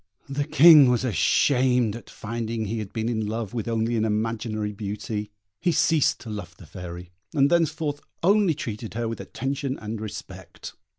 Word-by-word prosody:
The 140 +1 -2
King 150 -2 +8
was 125 0 +1
ashamed 125 - +2
at 120 - -10
finding 115 0 -4
he 110 +2 -3
had 105 -3 -6
been 110 0 -2
in 110 -3 -1
love 110 -2 -4
with 115 -3 -3
only 115 0 0
an 110 - +1
imaginary 110 -1 -1
beauty; 105 +1 -4 0.3
he 175 0 +1
ceased 160 -2 +2
to 115 - -9
love 90 -5 -7
the 90 - -13
Fairy, 90 +1 -9 0.2
and 140 +1 +4
thenceforth 155 -3 +1 0.2
only 195 -3 +4
treated 115 -5 -6
her 115 0 -1
with 115 - -4
attention 135 +2 -3
and 110 0 -6
respect. 95 -4 -8
115 Hz, 170 wpm, -25 LUFS, 105-135 Hz, 0.3 s, King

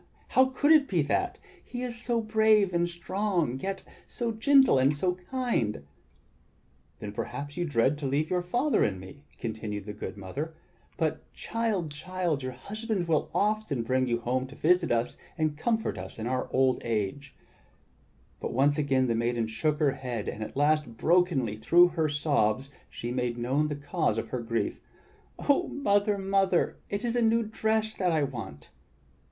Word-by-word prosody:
How 260 - +5
could 260 +3 +1
it 305 -3 +6
be 175 -5 +1
that? 370 - 0 0.3
He 245 0 -6
is 245 -1 -4
so 235 0 -1
brave 215 -3 +3
and 175 0 +1
strong, 175 - -1
yet 195 +4 -4 0.2
so 235 -1 -2
gentle 265 - +5
and 135 +3 +3
so 180 +5 +1 0.2
kind!" 235 - -1 1.1
"Then 105 - -6
perhaps 145 +7 -5
you 175 0 -1
dread 145 0 +1
to 140 - -2
leave 145 +5 0
your 180 -1 +2
father 245 +12 +1
and 95 -3 0
me," 140 +11 -12
continued 105 -3 -4
the 105 - -6
good 105 - -7
mother. 140 - -5 0.4
"But - - -2
child, 215 -9 -2
child, 175 -2 -2
your 130 0 -4
husband 205 - -3
will 160 -2 +1
often 210 - 0
bring 130 +2 +1
you 120 -1 +1
home 130 +2 -1
to 135 - -12
visit 175 +1 +2
us 115 0 0 0.2
and 155 -2 0
comfort 225 +8 -1
our 125 +3 -3
old 130 0 +2
age." 115 +5 -3 1.0
But - - -4
once 145 +4 +3
again 135 -3 +2
the 120 - +1
maiden 115 0 0
shook 150 +7 -1
her 150 -3 +3
head, 125 -5 -5
and 110 - -5
at 110 - -8
last, 145 -5 +1
brokenly, 160 - +2
through 175 +10 +5
her 160 -2 0
sobs, 140 -4 +1 0.2
she 120 - -5
made 125 -1 -1
known 135 +6 +1
the 150 - -3
cause 145 -6 -1
of 115 - -3
her 125 - -3
grief: 115 0 -2 0.6
"Oh 290 +5 +2
Mother, 205 -6 +1
Mother, 195 -2 +1
it 200 +4 -2
is 235 0 -1
a 240 - +2
new 230 0 +3
dress 220 0 0
that 185 -4 0
I 155 -2 +2
want!" 110 - -6
150 Hz, 170 wpm, -28 LUFS, 125-205 Hz, 1.1 s, it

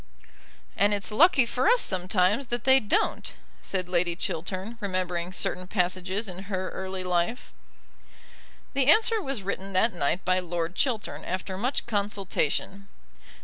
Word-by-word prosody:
'" - - -24 0.3
"And 205 +1 +3
it's 200 0 -3
lucky 275 +2 +5
for 250 +6 0
us 485 +2 +5
sometimes 185 +6 +1
that 240 0 -3
they 265 0 +6
don't," 215 -5 0 0.3
said 185 -2 -3
Lady 175 -1 +1
Chiltern, 185 +7 -4
remembering 185 -3 -2
certain 185 0 -1
passages 185 +2 -1
in 185 +1 -8
her 190 -2 -3
early 190 0 -5
life. 180 +6 -1 1.2
The 270 -1 +1
answer 445 +6 +5
was 270 - -4
written 195 0 -4
that 220 +5 +3
night 175 +1 -1
by 185 0 +3
Lord 175 -1 -3
Chiltern 235 -1 -2
after 185 +1 -4
much 245 +8 -1
consultation. 200 -3 -2
190 Hz, 145 wpm, -27 LUFS, 180-225 Hz, 1.2 s, they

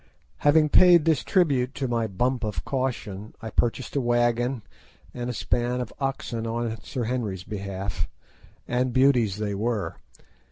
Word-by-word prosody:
Having 150 +1 +4
paid 175 -1 +7
this 160 -4 +2
tribute 140 -9 +2
to 140 -2 -2
my 115 -2 0
bump 120 +6 -1
of 105 -7 -3
caution, 120 -6 -3
I 110 -1 -7
purchased 120 +6 -1
a 140 - +2
wagon 120 0 +1 0.5
and 120 0 -4
a - - 0
span 120 +2 0
of 125 -3 -5
oxen 130 -4 -2
on 115 0 -3
Sir 125 - -4
Henry's 110 -6 -2
behalf, 95 -4 -4 0.6
and 125 0 0
beauties 125 -7 +3
they 105 -1 -2
were. 105 -4 -2
120 Hz, 150 wpm, -26 LUFS, 110-130 Hz, 0.6 s, paid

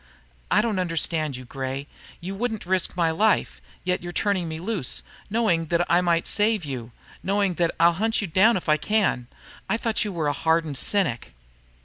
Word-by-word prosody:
"I - - +4
don't 220 -5 0
understand 165 -5 -1
you, 130 - -10
Gray. 135 +2 -4 0.4
You 185 +3 -5
wouldn't 220 0 -3
risk 185 0 0
my 165 -2 +2
life. 210 +6 +1 0.2
Yet 180 0 0
you're 175 0 -6
turning 185 -3 0
me 160 0 -5
loose, 185 - -2 0.3
knowing 200 -7 +1
that 170 +1 +1
I 175 +1 +5
might 170 -1 +1
save 210 -4 +1
you, 125 -4 -6 0.3
knowing 200 -1 +1
that 170 - +1
I'll 170 +1 +6
hunt 225 0 +2
you 205 - -1
down 195 +6 +4
if 180 - -7
I 155 0 +4
can. 195 - 0 0.4
I 225 - +2
thought 225 -1 0
you 210 - -3
were 165 -4 -2
a 145 - +1
hardened 160 -3 0
cynic." 140 - 0
175 Hz, 190 wpm, -24 LUFS, 160-205 Hz, 0.4 s, I'll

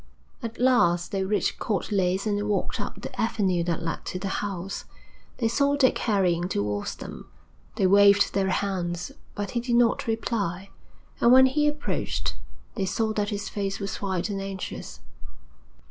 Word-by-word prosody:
At 230 0 -6
last 175 -9 +3
they 195 -1 0
reached 205 +2 0
Court 205 -1 -2
Leys 190 0 +1
and 205 0 0
walked 205 - -1
up - - -6
the - - -4
avenue 190 -6 +1
that 170 -1 -1
led 165 -1 -3
to - - -3
the 195 +1 -3
house. 195 -2 -4 0.5
They 230 - +1
saw 280 +5 +2
Dick 270 -3 +3
hurrying 180 -5 +1
towards 105 - -2
them. - - -9 0.5
They 195 - +2
waved 200 +1 +6
their 195 -1 +1
hands, 180 -3 -2 0.2
but 200 -1 -3
he 240 - 0
did 240 0 0
not 240 +2 +3
reply, 200 -4 -2 0.5
and, 235 - +5
when 260 +1 +9
he 295 +3 +2
approached, 295 0 -2 0.4
they 195 - -1
saw 220 +3 0
that 205 -1 -1
his 205 -2 -3
face 200 -1 -3
was 200 -1 -3
white 190 -3 -1
and 195 -1 -3
anxious. 195 0 -6
200 Hz, 165 wpm, -26 LUFS, 185-225 Hz, 0.5 s, when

